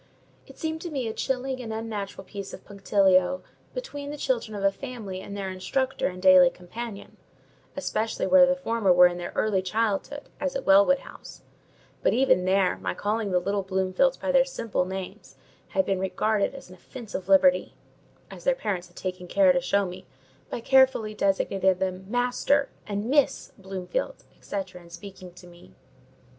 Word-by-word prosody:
It - - -15
seemed 320 -1 -3
to 350 - -5
me 270 -6 -3
a 220 - -3
chilling 260 +1 -2
and 225 -2 -6
unnatural 215 -3 -5
piece 200 0 -7
of - - -17
punctilio 195 +3 +2 0.3
between 290 -14 -6
the 295 - -6
children 235 -6 -1
of 200 - -4
a 195 - +4
family 210 -5 -7
and 200 +1 -8
their 195 -1 -3
instructor 260 +8 -1
and 185 0 -6
daily 185 -1 +7
companion; 200 +5 -9 0.6
especially 225 +1 -2
where 275 -1 +7
the 270 - +2
former 230 -7 +1
were 180 0 +7
in 175 0 +1
their 175 - -5
early 205 -3 +1
childhood, 220 +8 -1 0.2
as 280 -1 -2
at 270 - -3
Wellwood 200 +8 +5
House; - - -13 0.6
but - - +2
even 230 -7 +3
there, 190 0 +2
my - - -3
calling 210 0 -1
the 180 - +2
little 200 +2 -1
Bloomfields 190 +8 +1
by 280 - -1
their 265 -1 +5
simple 230 -8 -2
names 190 0 -7 0.3
had 285 - 0
been 195 -1 0
regarded 200 +5 0
as 275 - -10
an 180 - -13
offensive 195 -1 -8
liberty: 270 +8 +4 0.6
as - - -11
their - - +2
parents 185 - -3
had 175 - -24
taken 185 -1 -5
care 190 0 +4
to 180 - +1
show 200 +3 +1
me, 180 0 -9 0.4
by - - -4
carefully 260 -4 +3
designating 195 -2 +1
them 185 0 -3
Master 250 +4 +1 0.2
and 205 0 -3
Miss 285 +3 +1
Bloomfield, 195 - -4 0.2
&c., - - -8 0.2
in 175 -1 -13
speaking 185 +1 -10
to 180 0 -14
me. 175 - -17
200 Hz, 175 wpm, -26 LUFS, 185-255 Hz, 0.6 s, daily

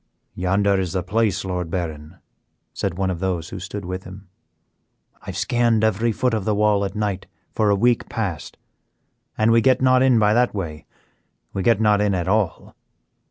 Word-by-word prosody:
"Yonder 95 +2 +1
is 95 -2 -3
the 95 -2 -1
place, 100 0 0
Lord 90 -3 -3
Baron," 80 -1 -5 0.6
said 85 - -3
one 95 -1 0
of 85 - -4
those 90 -3 -2
who 95 - -7
stood 100 +1 -6
with 90 +1 -5
him. 95 0 -12 0.9
"I - - -20
have - - -5
scanned 120 -2 +1
every 110 +2 +1
foot 125 +3 0
of 110 -3 -1
the 105 +1 0
wall 105 -1 +2
at 100 +1 -4
night 105 -3 -2 0.3
for 105 -1 +1
a 100 - +4
week 120 +3 +1
past. 100 -10 -4 0.8
An 110 +1 +3
we 115 0 +5
get 130 +2 +3
not 130 0 +4
in 130 -2 +4
by 105 -1 +3
that 120 -1 +2
way, 80 -6 -5 0.7
we 95 - -2
get 110 +2 +3
not 105 -2 +3
in 105 -2 +1
at 90 -1 -2
all. 100 -3 -1
100 Hz, 190 wpm, -22 LUFS, 95-110 Hz, 0.9 s, we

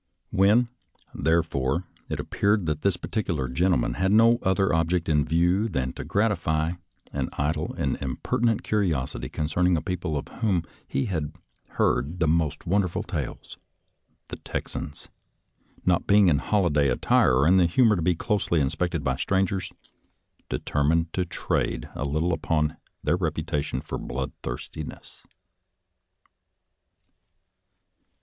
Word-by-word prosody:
When, 105 +6 +4 0.5
therefore, 80 -1 +1 0.3
it - - -3
appeared 100 -2 +1
that 75 -1 -1
this 100 -3 +1
particular 85 - -2
gentleman 85 0 +1
had 95 +7 +1
no 115 +2 +6
other 95 0 +2
object 85 +1 +1
in 75 -2 +3
view 90 +7 +2
than 65 -7 -2
to - - -6
gratify 85 -7 +1 0.4
an - - -2
idle 75 +2 -1
and - - -2
impertinent 110 - 0
curios 85 -12 0
ity 65 +1 -5
concerning 85 +3 +1
a - - -2
people 85 -4 -2
of 70 - -5
whom 95 -7 +1 0.2
he 70 - -1
had 80 -6 -3 0.4
heard 75 +8 +1
the 80 - +2
most 80 -1 0
wonderful 95 -1 +1
tales, - - -5 0.7
the - - -6
Texans, 70 - -5 0.8
not 90 -2 +2
being 100 -2 +6
in 70 -4 +3
holiday 75 -9 +2
attire 65 +1 +3
or 65 +4 +4
in 95 +2 +6
the 90 -2 +5
humor 110 +5 +4
to 90 - -2
be 90 +2 +2
closely 100 -3 0
inspected 85 +3 -1
by 65 -1 +1
strangers, 95 +4 0 0.8
determined 80 +3 0
to 90 - 0
trade - - -2
a 70 - -3
little 80 +5 0
upon 75 -1 0 0.3
their 75 +4 +2
reputation 80 -5 -2
for - - -5
bloodthirstiness. 65 +3 -6
85 Hz, 130 wpm, -26 LUFS, 75-95 Hz, 0.8 s, no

